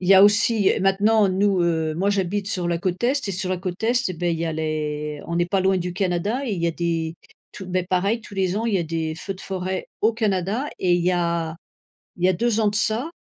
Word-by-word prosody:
il 180 - -3
y 195 - +8
a 190 - +8
aussi, 210 0 +4
heu, - - 0
maintenant 200 +2 +3
nous 190 0 +2
heu, 160 -2 0
moi 190 +5 +1
j'habite 200 0 -1
sur 180 -5 -1
la 170 -1 0
côte 180 +3 -2
est 260 -2 +1
et - - -1
sur 185 +1 -3
la 185 - 0
côte 180 +1 -5
est 240 0 +2
et - - -3
bah, 175 +2 -3
il 165 -1 0
y 165 - -1
a 160 - -2
les 150 -1 -3
on 170 - -2
n'est 175 0 +2
pas 190 +2 +1
loin 190 0 +2
du 180 0 -3
Canada 195 +7 -1
et 225 - -1
il 175 -4 -3
y - - +2
a - - +2
des 165 -1 -2 0.4
tous, 190 - -8
bah, 185 0 0
pareil 195 +5 +1
tous 210 - -12
les 190 -1 0
ans, 225 +2 -1
il 225 - 0
y - - +3
a - - 0
des 160 -1 -3
feux 195 +5 -5
de 185 - -13
forêt 185 0 -4 0.2
au 220 +2 +4
Canada 215 +2 -1
et 180 -2 +3
il 175 - +1
y 180 - +3
a 170 -2 -1 0.6
il 175 - -3
y - - +6
a - - +4
2 225 +4 +1
ans 215 - +3
de 205 - -1
ça 225 +9 0
185 Hz, 280 wpm, -23 LUFS, 170-205 Hz, 0.6 s, y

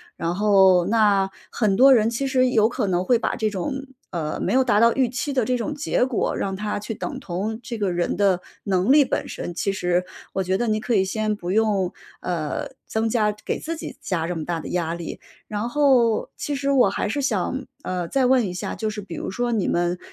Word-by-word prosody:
然 170 +1 -2
后 190 -3 +5
那 205 -3 +3 0.2
很 210 -4 +1
多 265 +5 +7
人 225 -3 +4
其 235 +4 -2
实 255 -1 +2
有 220 -2 +3
可 240 -3 -2
能 180 -1 +1
会 240 +4 +3
把 - - -1
这 220 - 0
种 265 +8 -4 0.3
呃， 160 -4 -3
没 - - -1
有 260 +1 +4
达 240 -5 +3
到 230 +1 +5
预 260 -3 +2
期 255 +4 -3
的 255 -3 +2
这 250 +2 0
种 295 +5 -3
结 290 -3 +1
果， 255 -3 -1
让 195 -1 -2
它 210 +1 -3
去 210 +2 -5
等 260 +5 -5
同 210 +1 -4
这 235 0 -6
个 200 -3 0
人 175 0 -1
的 195 -3 +2 0.2
能 190 +1 +1
力 295 0 +7
本 - - -2
身， 175 - -5
其 195 +3 -1
实 180 -1 0 0.3
我 195 - -1
觉 185 0 0
得 240 - -1
你 215 0 +1
可 230 +2 -1
以 190 - +4
先 215 +2 -1
不 180 -3 -5
用， 205 -3 +2 0.3
呃， 165 -4 -3 0.2
增 225 +1 0
加 215 -2 +1
给 - - -2
自 330 +1 -4
己 315 - -8
加 170 -4 -1
这 175 - -2
么 155 - -4
大 170 -2 -2
的 - - -7
压 170 -2 -1
力。 170 -1 -6 0.3
然 210 +2 -2
后 245 -4 +3
其 290 - -3
实 280 0 0
我 255 -7 +5
还 205 - -2
是 285 +6 -1
想， 260 +2 -1 0.2
呃， 180 -2 -3
再 265 +7 +1
问 250 -4 +3
一 180 - -5
下， 180 - -4
就 220 - -2
是 210 0 -5
比 200 - -8
如 - - -4
说 240 +5 -1
你 220 -4 0
们 175 +1 0
210 Hz, 250 characters per minute, -23 LUFS, 185-245 Hz, 0.3 s, 多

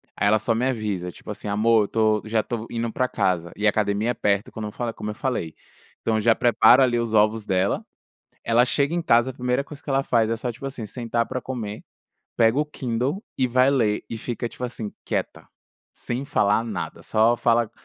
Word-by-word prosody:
Aí 100 - +1
ela 110 +1 +4
só 110 +2 0
me 120 - 0
avisa, 105 -8 -2
tipo - - -14
assim: 105 - -5
"Amor 110 +1 +3
eu - - -7
tô 110 -1 +2
já 110 0 +1
tô 115 0 -5
indo 115 0 -2
pra 130 0 0
casa." 90 -4 0
E 105 - -2
a - - +8
academia 105 +2 0
é - - -1
perto, 100 -2 0
quando 110 -1 -5
eu - - -7
falo 120 0 -3
é - - -18
como 105 - -6
eu - - -3
falei. 110 - -2 0.5
Então 110 - 0
eu 110 - +1
já 115 +1 +5
preparo 120 +2 +5
ali 120 -2 +3
os 115 -1 -2
ovos 110 0 +3
dela. 95 +1 0 0.6
Ela 115 +1 +4
chega 140 +5 +1
em 175 - 0
casa, 120 -3 +3
a - - -17
primeira 125 +2 -1
coisa 150 0 -11
que - - -9
ela 135 0 +2
faz 115 -4 +2
é 115 - +1
só, 125 +2 -3
tipo 135 +4 -7
assim, 130 -5 -6
sentar 115 +1 -2
pra 130 - -4
comer, 110 -5 -5 0.5
pega 115 +4 +4
o 150 - +1
Kindle 135 - -2 0.2
e 130 - +3
vai 130 +2 +3
ler, 110 -6 +1
e 115 - -4
fica, 120 +1 -4
tipo 125 - -7
assim, 120 -4 -5
quieta, - - -3 0.5
sem 125 +3 -4
falar 110 -5 +2
nada. 100 -7 -5
Só 115 +2 +3
fala, 115 -1 +2
115 Hz, 230 wpm, -24 LUFS, 105-125 Hz, 0.6 s, a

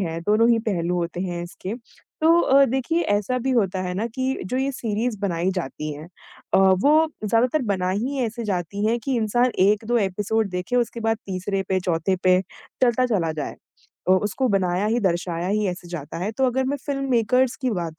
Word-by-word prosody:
है 165 -3 -3
दोनों 215 +6 +3
ही 230 - +4
पहलू 175 -3 -1
होते 175 0 -3
हैं 175 -2 -3
इसके। 185 +4 -6 0.5
तो 330 +2 +6
अ, 275 -3 +5
देखिए 265 +6 0
ऐसा 205 - 0
भी 260 +2 -1
होता 195 -7 +1
है 180 -1 -3
ना 210 +5 -1
कि 260 +3 -2
जो 220 +8 -3
ये 265 +1 0
सिरीज़ 225 -2 -2
बनाई 180 -2 0
जाती 155 -3 -4
हैं 150 +2 -9 0.5
अ, - - +6
वो 200 - +5 0.2
ज़्यादातर 245 +7 +2
बनाई 185 0 -1
ही 270 +5 -2
ऐसे 230 +1 -5
जाती 185 +3 -3
हैं 235 +2 +2
कि 270 -2 0
इंसान 240 +3 +2
1-2 215 +5 +3
एपिसोड 205 +2 0
देखे 180 +7 -2
उसके 235 -1 0
बाद 225 0 +1
तीसरे 195 +1 -2
पे, 190 -1 +1
चौथे 180 +1 0
पे 185 0 +5 0.4
चलता 255 0 +3
चला 180 -9 0
जाए। 150 -2 -5 0.5
अ, 185 - +6
उसको 210 +7 +1
बनाया 190 0 +1
ही, 230 +3 +1
दर्शाया 175 -2 -1
ही 210 +1 +1
ऐसे 180 -1 -6
जाता 165 -3 -6
है 190 +5 -2
तो 265 - +3
अगर 260 +1 0
मैं 280 +2 -1
फ़िल्मेकर्स 260 -2 +1
की 260 -2 -1
बात 170 -6 -4
205 Hz, 195 wpm, -23 LUFS, 180-245 Hz, 0.5 s, तो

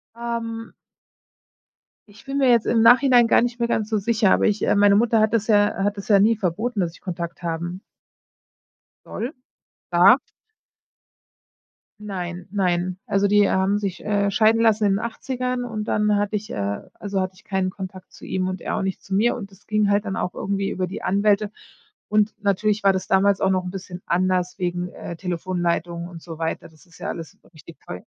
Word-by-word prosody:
Ähm 230 -1 -5 1.3
Ich 205 0 -17
bin 275 +1 -3
mir 270 -2 +3
jetzt 235 -2 +4
im 225 - +2
Nachhinein 245 +1 +6
gar - - +5
nicht 240 0 -2
mehr 235 - +1
ganz 215 -2 -1
so 220 - +1
sicher, 210 -1 +2
aber - - +3
ich, 210 -1 +1
äh - - +2
meine 200 0 +5
Mutter 225 +1 +3
hat 215 +1 +2
das 220 -2 +1
ja 205 -2 +3
hat 205 +1 0
das 200 - -7
ja 205 -2 +5
nie 220 +3 +4
verboten, 210 +4 -2
dass 170 -3 -1
ich - - -18
Kontakt 170 -2 -6
haben 170 +2 -4 1.2
soll 240 +4 -4 0.6
darf. 180 +10 +6 1.8
Nein, 180 -4 -6
nein. 180 -2 0
Also, 200 0 +2
die 205 0 +4
haben 190 +2 +2
sich, 200 -3 -4
äh, 200 -1 +1
scheiden 220 +2 +3
lassen 220 -2 +3
in 200 0 +2
80ern 250 +2 -3
und 220 -3 -4
dann 210 0 +2
hatte 205 +1 0
ich 215 +1 -9
äh, 100 0 -2
also 200 -1 -4
hatte 185 0 -2
ich - - -20
keinen 190 -1 -1
Kontakt 185 -1 -9
zu - - -16
ihm 185 -1 -1
und 185 -1 -4
er - - -2
auch - - -1
nicht 190 -1 -3
zu 195 - -7
mir, 220 +5 +3
und 200 -4 -8
das 195 +1 -21
ging 215 -1 +2
halt 205 +1 +2
dann 195 -2 -3
auch 180 - -2
irgendwie 195 0 -2
über 185 -1 -2
die 185 - -7
Anwälte. 205 +1 +2 0.6
Und, 210 0 +2
natürlich 205 +1 +1
war 195 - +6
das 190 - -3
damals 195 +1 +3
auch 190 - +3
noch 185 -1 0
‘n - - -3
bisschen 180 -1 -8
anders 180 0 0
wegen, 175 0 -2
äh, 170 -1 -8
Telefonleitungen 175 -1 -2
und 170 -2 -11
so 165 -1 -9
weiter, 165 0 -3
das 160 +2 -22
ist 180 0 -19
ja - - -4
alles 165 -2 -7 0.2
richtig 155 +1 -14
teu 90 - -7
200 Hz, 200 wpm, -23 LUFS, 180-215 Hz, 1.8 s, Nachhinein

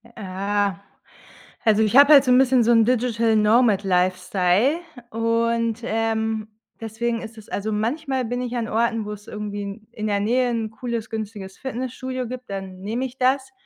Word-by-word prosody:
Äh, 200 0 -1 0.9
also, 220 -1 +4
ich 220 +3 +1
habe 285 +2 +8
halt 275 -2 +7
so 255 - +1
'n 250 - +6
bisschen 260 -2 +4
so 235 - +4
'n 230 -1 +5
Digital 230 -2 +1
Nomad 215 -1 +4
Lifestyle 185 - +2 0.3
und, 230 0 0
ähm, 220 -1 -1 0.3
deswegen 230 +1 -3
ist 225 0 -9
es 215 - -13
also, 215 +2 -3
manchmal 260 +5 -1
bin 245 +2 -3
ich 245 0 -4
an 230 -2 -2
Orten, 230 0 0
wo 210 - -5
es 210 0 -10
irgendwie 205 -1 -5
in 200 +2 -8
in 215 -2 -4
der 205 -1 0
Nähe 245 +4 +1
'n 225 -2 -2
cooles, 235 -1 -5
günstiges 210 -3 -6
Fitnessstudio 255 0 -4
gibt, 255 -1 -8
dann 190 -1 -6
nehme 225 +6 -3
ich 260 0 -7
das, 265 +1 +1
225 Hz, 175 wpm, -23 LUFS, 210-245 Hz, 0.9 s, habe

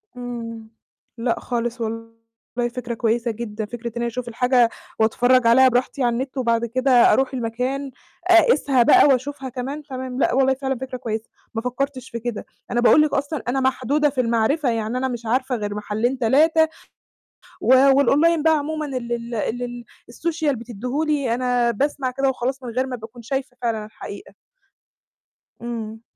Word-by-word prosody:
امم. 230 -2 -7 0.5
لأ 235 0 -1
خالص، 240 0 -3
والله 230 0 -4 0.7
فكرة 245 -1 -4
كويسة 230 +1 0
جدًا، 215 -1 -5
فكرة 235 +2 -7
إن 230 - -5
أنا 235 0 -1
أشوف 240 +1 -5
الحاجة 245 0 +3 0.3
وأتفرج 245 +3 +3
عليها 260 +3 +7
براحتي 255 +2 0
على 240 -1 +2
النت، 260 +3 -4
وبعد 235 -2 +1
كده 255 +3 0 0.2
أروح 270 +1 +1
المكان، 255 +3 -3 0.4
أقيسها 290 -7 +5
بقى، - - +6
وأشوفها 270 0 0
كمان، 270 +5 -5
تمام، 260 -2 -6
لأ 240 - +2
والله 265 +1 +3
فعلًا 265 0 -2
فكرة 260 0 -6
كويسة، 225 -3 -4 0.2
ما 225 - -2
فكرتش 260 +1 -3
في 235 - -5
كده. 235 -2 -4 0.3
أنا 240 0 +1
باقول 300 +5 +6
لِك 305 - +1
أصلًا 285 +1 -2
أنا 265 +2 +1
محدودة 265 +3 +1
في 260 -2 0
المعرِفة، 235 +5 +1
يعني 225 +1 -1
أنا 260 +1 0
مش 240 -2 -5
عارفة 255 +3 0
غير 205 -2 -4
محلين، 215 +5 -1
3 315 +7 +4 0.9
و 260 - +4 0.2
والonline 300 +4 +3
بقى 320 -1 +4
عمومًا 305 +1 -3
اللي 245 -4 -3
ال 235 0 -6
اللي 240 +2 -3 0.3
الsocial 315 +2 -1
بتدّيه 245 +5 -4
لي، 285 -6 0
أنا 245 -1 +1
باسمع 270 +2 -1
كده 270 +1 +1
وخلاص، 260 +1 -3
من 245 - -5
غير 255 +3 -1
ما 255 - -4
باكون 235 +1 -11
شايفة 265 +1 -4
فعلًا 225 -3 -1
الحقيقة. 215 - -10 1.3
امم. 225 -2 -5
250 Hz, 165 wpm, -22 LUFS, 235-270 Hz, 1.3 s, عليها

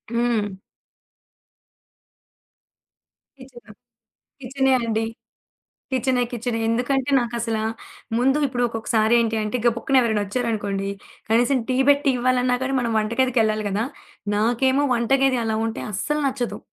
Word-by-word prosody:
హ్మ్. 225 -5 0 2.8
కిచెన్. 245 -4 -14 0.7
కిచెనే 265 +1 0
అండి. 225 -1 -1 0.9
కిచెనే, 255 -1 +1
కిచెనే. 240 -1 -2
ఎందుకంటే 255 +3 0
నాకసలు 230 -2 -2 0.6
ముందు 270 +4 +3
ఇప్పుడు 245 -2 -2
ఒక్కొక్కసారి 225 0 +1
ఏంటంటే, 220 0 -1
గబ్బుక్కున 235 -1 +3
పక్కన 265 +3 +3
ఎవరైనా 220 -4 +1
వచ్చారనుకోండి, 205 -3 -2 0.4
కనీసం 245 +4 +3
టీ 255 - +1
పెట్టి 285 0 +4
ఇవ్వాలన్నా 250 0 +2
కానీ, 270 +1 -1
మనం 235 -1 -1
వంటగదికెళ్లాలి 220 -1 +1
కదా! 205 +3 -1 0.5
నాకేమో 245 +6 +2
వంటగది 265 +2 +2
అలా 220 -1 -1
ఉంటే 225 - -4
అస్సలు 300 +10 -1
నచ్చదు. 255 -3 -2
240 Hz, 110 wpm, -22 LUFS, 220-260 Hz, 2.8 s, పెట్టి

